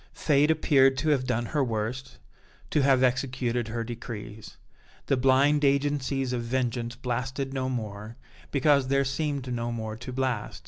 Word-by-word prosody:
Fate 145 Hz, 0 st, +2 dB
appeared 135 Hz, -4 st, +4 dB
to 155 Hz, +5 st, 0 dB
have 130 Hz, -4 st, +1 dB
done 120 Hz, -1 st, 0 dB
her 145 Hz, +3 st, 0 dB
worst, 125 Hz, +3 st, -3 dB, 0.5 s
to 150 Hz, -, +3 dB
have 135 Hz, -1 st, +4 dB
executed 125 Hz, -2 st, 0 dB
her 115 Hz, +1 st, -3 dB
decrees. 110 Hz, -2 st, -8 dB, 0.5 s
The -, -, +2 dB
blind 135 Hz, +3 st, +3 dB
agencies 140 Hz, -2 st, +1 dB
of 120 Hz, -, -1 dB
vengeance 120 Hz, 0 st, -2 dB
blasted 130 Hz, +2 st, -3 dB
no 130 Hz, -1 st, -1 dB
more, 110 Hz, -2 st, -5 dB, 0.3 s
because 140 Hz, -1 st, +3 dB
there 140 Hz, +1 st, +2 dB
seemed 135 Hz, -2 st, -2 dB
no 120 Hz, 0 st, -2 dB
more 110 Hz, -2 st, -4 dB
to 120 Hz, +2 st, -7 dB
blast. 125 Hz, -4 st, -2 dB
130 Hz, 150 wpm, -27 LUFS, 120-135 Hz, 0.5 s, appeared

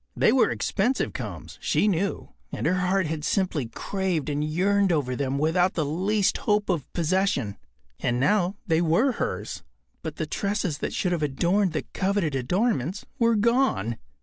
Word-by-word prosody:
They -, -, +5 dB
were 260 Hz, -, +4 dB
expensive 235 Hz, +6 st, 0 dB
combs, -, -, -7 dB
she -, -, +2 dB
knew, 195 Hz, 0 st, -1 dB, 0.2 s
and -, -, -4 dB
her 165 Hz, -, +3 dB
heart 185 Hz, +1 st, +1 dB
had 155 Hz, -1 st, -3 dB
simply 175 Hz, -, 0 dB
craved 180 Hz, -, -2 dB
and 145 Hz, 0 st, -1 dB
yearned 190 Hz, +5 st, +2 dB
over 135 Hz, -6 st, 0 dB
them 135 Hz, 0 st, -1 dB
without 175 Hz, +5 st, +2 dB
the 155 Hz, -, 0 dB
least 190 Hz, +7 st, +1 dB
hope 210 Hz, -1 st, +1 dB
of 165 Hz, -8 st, -1 dB
possession. 175 Hz, -, 0 dB, 0.4 s
And 120 Hz, -1 st, 0 dB
now, 180 Hz, +7 st, +2 dB
they 165 Hz, -4 st, +2 dB
were 175 Hz, +11 st, +3 dB
hers, -, -, -3 dB, 0.4 s
but -, -, -5 dB
the -, -, -2 dB
tresses 200 Hz, -6 st, -2 dB
that -, -, -2 dB
should 180 Hz, -, -1 dB
have 170 Hz, -3 st, 0 dB
adorned 170 Hz, +6 st, +1 dB
the 155 Hz, -, -2 dB
coveted 190 Hz, -5 st, 0 dB
adornments 175 Hz, -, 0 dB
were 230 Hz, -1 st, +4 dB
gone. 225 Hz, -, +2 dB
180 Hz, 165 wpm, -26 LUFS, 150-200 Hz, 0.4 s, They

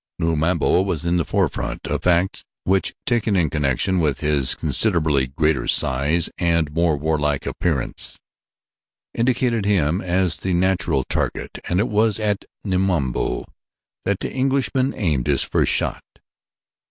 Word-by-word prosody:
Numabo 80 Hz, +2 st, +1 dB
was 85 Hz, -6 st, -2 dB
in 85 Hz, +1 st, +1 dB
the 85 Hz, -, +1 dB
forefront, -, -, -2 dB
a -, -, -2 dB
fact 90 Hz, +1 st, +1 dB, 0.2 s
which 95 Hz, +1 st, 0 dB
taken 115 Hz, -4 st, +1 dB
in 85 Hz, -5 st, +1 dB
connection 75 Hz, +5 st, 0 dB
with 75 Hz, -5 st, 0 dB
his 70 Hz, -4 st, +2 dB
considerably 75 Hz, -, +1 dB
greater 75 Hz, -1 st, 0 dB
size 70 Hz, +6 st, +3 dB
and 85 Hz, -3 st, +1 dB
more 85 Hz, -2 st, +1 dB
warlike 75 Hz, -1 st, -1 dB
appearance, 75 Hz, -8 st, -1 dB, 1.0 s
indicated 120 Hz, -2 st, +1 dB
him 90 Hz, -4 st, +1 dB
as 90 Hz, 0 st, +1 dB
the 95 Hz, -, -2 dB
natural 85 Hz, -6 st, +1 dB
target -, -, -3 dB
and 90 Hz, -, +1 dB
it 110 Hz, -, +1 dB
was 110 Hz, 0 st, +2 dB
at 105 Hz, -2 st, -1 dB, 0.2 s
Numabo 90 Hz, -, -1 dB, 0.6 s
that 100 Hz, -1 st, -1 dB
the -, -, -4 dB
Englishman 135 Hz, 0 st, 0 dB
aimed 75 Hz, -, -1 dB
his -, -, +3 dB
first -, -, +1 dB
shot. -, -, 0 dB
85 Hz, 135 wpm, -21 LUFS, 75-95 Hz, 1.0 s, size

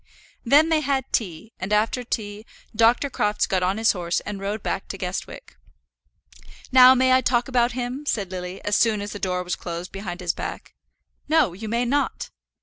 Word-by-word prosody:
Then 290 Hz, +6 st, +5 dB
they 320 Hz, -1 st, +3 dB
had 275 Hz, -4 st, -1 dB
tea, 215 Hz, -1 st, -2 dB
and 190 Hz, +2 st, -5 dB
after 215 Hz, +4 st, +1 dB
tea 210 Hz, -3 st, -4 dB, 0.3 s
Dr. 230 Hz, +5 st, +4 dB
Crofts 210 Hz, -5 st, 0 dB
got 190 Hz, -1 st, 0 dB
on 185 Hz, +3 st, 0 dB
his 225 Hz, 0 st, +3 dB
horse 175 Hz, -2 st, -2 dB
and 205 Hz, -1 st, -6 dB
rode 200 Hz, +2 st, -4 dB
back 195 Hz, -, -3 dB
to 195 Hz, -, -6 dB
Guestwick. 180 Hz, -, -6 dB, 1.1 s
"Now 255 Hz, 0 st, +8 dB
may 260 Hz, 0 st, +3 dB
I 260 Hz, -, +5 dB
talk 240 Hz, -2 st, +1 dB
about 245 Hz, -2 st, +1 dB
him?" 255 Hz, +4 st, -5 dB
said 200 Hz, -8 st, -1 dB
Lily, 180 Hz, 0 st, -6 dB
as 205 Hz, -, +1 dB
soon 215 Hz, -3 st, +2 dB
as 205 Hz, -, -6 dB
the 205 Hz, -, -7 dB
door 180 Hz, -1 st, -1 dB
was 180 Hz, -, -3 dB
closed 170 Hz, +1 st, -6 dB
behind 190 Hz, -3 st, -6 dB
his 175 Hz, -2 st, -1 dB
back. -, -, -7 dB, 0.6 s
"No; 310 Hz, -, +3 dB
you 215 Hz, +4 st, -7 dB
may 235 Hz, +2 st, 0 dB
not." 280 Hz, +4 st, -1 dB
215 Hz, 190 wpm, -23 LUFS, 190-250 Hz, 1.1 s, Now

